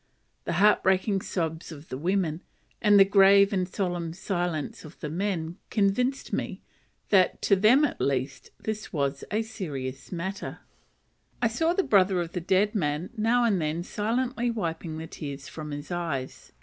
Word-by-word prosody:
The - - -1
heartbreaking 195 -1 +3
sobs 165 -2 -3
of 155 -1 -11
the 130 - -4
women, 175 -1 0 0.4
and 205 -2 +6
the 195 - +9
grave 200 0 +6
and 185 -1 0
solemn 175 -4 -2
silence 175 -4 -3
of 155 +2 -13
the 150 - -5
men, 175 -2 -2
convinced 245 +6 0
me, - - -3 0.5
that 190 -3 +4
to 200 - +5
them 230 +10 +5
at - - -4
least, 135 -1 -1
this 215 -1 -5
was 140 -2 -1
a 215 +2 0
serious 140 - -6
matter: 190 +2 -5 0.8
I 230 - +2
saw 325 +9 +1
the 390 - +1
brother 195 - +3
of 170 -1 -3
the 180 - -3
dead 190 +4 +2
man 160 -1 -1
now 230 +2 +2
and 205 -7 +2
then 155 +2 -1
silently 240 +5 -1
wiping 165 -7 -3
the 160 - -5
tears 140 -3 -7
from 155 -1 -7
his 145 +3 -6
eyes. 160 -7 -4
185 Hz, 160 wpm, -27 LUFS, 160-210 Hz, 0.8 s, the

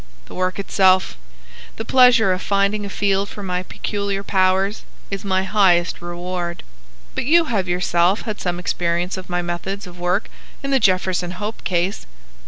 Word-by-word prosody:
The - - -13
work 185 0 -1
itself, 190 - +3 0.6
the 225 - -5
pleasure 240 -6 +5
of 185 - -4
finding 200 +1 0
a - - -7
field 195 0 0
for 205 - -8
my 180 -1 -2
peculiar 200 +1 -3
powers, 190 +1 +1 0.3
is 195 0 -4
my 190 -1 +1
highest 190 -4 +2
reward. 175 0 -5 0.5
But - - -2
you 330 +4 +5
have 190 -4 0
yourself 175 +2 +2
had 215 -3 -5
some 175 -1 -1
experience 175 0 -1
of 185 -1 -9
my 175 0 -1
methods 190 +4 -4
of 180 -1 -12
work 180 +4 0 0.4
in 275 - -2
the 270 - +4
Jefferson 185 -3 +1
Hope 205 +5 -6
case." 180 - -1
190 Hz, 165 wpm, -21 LUFS, 180-200 Hz, 0.6 s, pleasure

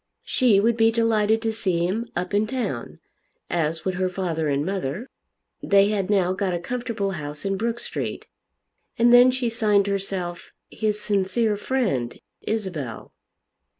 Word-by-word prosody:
She 235 -6 +3
would 230 +3 +2
be 225 0 +5
delighted 225 -1 +2
to 225 -1 0
see 180 -5 0
him 220 +6 -2
up 180 +2 -3
in 210 +1 +2
town, 195 - -4 0.5
as 160 -1 -1
would 190 - 0
her 185 - +2
father 175 -4 -2
and 140 0 0
mother. 190 - -3 0.5
They 200 0 +4
had 200 -2 -1
now 185 -3 +2
got 185 -2 -1
a - - -2
comfortable 230 0 -3
house 150 -2 -6
in 195 0 0
Brook 230 +4 -2
Street. - - -4 0.7
And 235 +1 +5
then 245 +1 +8
she 255 -1 0
signed 210 -3 +2
herself 190 -3 -3 0.2
his 210 -1 -1
sincere 210 +2 +1
friend, 200 - -1 0.2
Isabel. 180 - -4
200 Hz, 150 wpm, -24 LUFS, 175-225 Hz, 0.7 s, then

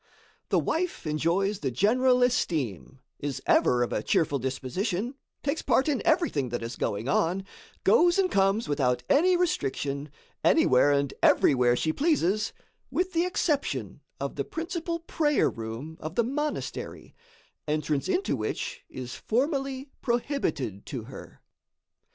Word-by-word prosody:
The - - +3
wife 350 - -1
enjoys 170 +6 0
the 135 - -1
general 250 - +3
esteem, 135 - -1 0.2
is 145 -2 -3
ever 120 -1 +4
of 120 - -3
a - - 0
cheerful 145 -4 +1
disposition, 175 - -2 0.3
takes 285 +3 -1
part 265 +2 +2
in 290 -4 +1
everything 315 - +1
that 120 0 -3
is 115 +1 -5
going 105 +4 -2
on, 175 +6 +1 0.4
goes 345 +1 +5
and 380 -2 +2
comes 195 +3 +2
without 125 -4 +1
any 360 +5 +5
restriction, 145 - -1 0.3
anywhere 130 +3 +5
and 140 -1 +1
everywhere 125 -3 +4
she 155 +5 0
pleases, 215 - +1 0.4
with 370 +1 -1
the 335 +1 +2
exception 305 -5 -1 0.2
of - - -4
the - - 0
principal 335 0 -3
prayer 300 -3 +1
room 115 +8 -7
of 160 +3 -6
the 235 - +3
monastery, 295 +5 -4 0.5
entrance 150 -2 -1
into 370 +2 +1
which - - -4
is 125 -1 -7
formally 270 +2 -1
prohibited 235 - -1
to 130 -7 -5
her. 130 +4 -12
195 Hz, 135 wpm, -27 LUFS, -, 0.5 s, goes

